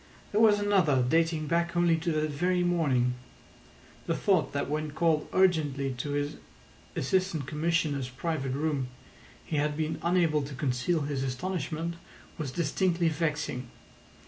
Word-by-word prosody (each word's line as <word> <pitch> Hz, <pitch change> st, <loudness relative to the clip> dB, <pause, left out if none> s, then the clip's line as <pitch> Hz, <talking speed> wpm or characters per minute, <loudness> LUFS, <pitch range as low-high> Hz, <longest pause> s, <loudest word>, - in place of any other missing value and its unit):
There 210 Hz, -, +2 dB
was 210 Hz, -2 st, +6 dB
another 180 Hz, -11 st, +3 dB
dating 160 Hz, +1 st, +2 dB
back 170 Hz, +2 st, 0 dB
only 175 Hz, -1 st, +4 dB
to 165 Hz, +1 st, -1 dB
that 155 Hz, 0 st, 0 dB
very 180 Hz, +4 st, +1 dB
morning. 140 Hz, -9 st, +2 dB, 0.9 s
The -, -, +1 dB
thought 185 Hz, -6 st, +2 dB
that 140 Hz, -, -2 dB
when 155 Hz, +1 st, -2 dB
called 160 Hz, -1 st, +1 dB
urgently 150 Hz, -8 st, +2 dB
to 145 Hz, +2 st, -2 dB
his 145 Hz, +1 st, -2 dB, 0.6 s
Assistant 175 Hz, 0 st, 0 dB
Commissioner's 150 Hz, -3 st, 0 dB
private 135 Hz, 0 st, -2 dB
room 145 Hz, -2 st, -1 dB, 0.6 s
he 155 Hz, -, -2 dB
had 150 Hz, 0 st, 0 dB
been 155 Hz, 0 st, -2 dB
unable 170 Hz, -3 st, +2 dB
to 140 Hz, 0 st, -6 dB
conceal 135 Hz, +5 st, 0 dB
his 140 Hz, -2 st, -2 dB
astonishment 170 Hz, +4 st, -3 dB, 0.4 s
was 150 Hz, -4 st, -2 dB
distinctly 170 Hz, +2 st, +1 dB
vexing. 150 Hz, -6 st, -2 dB
155 Hz, 140 wpm, -29 LUFS, 140-170 Hz, 0.9 s, was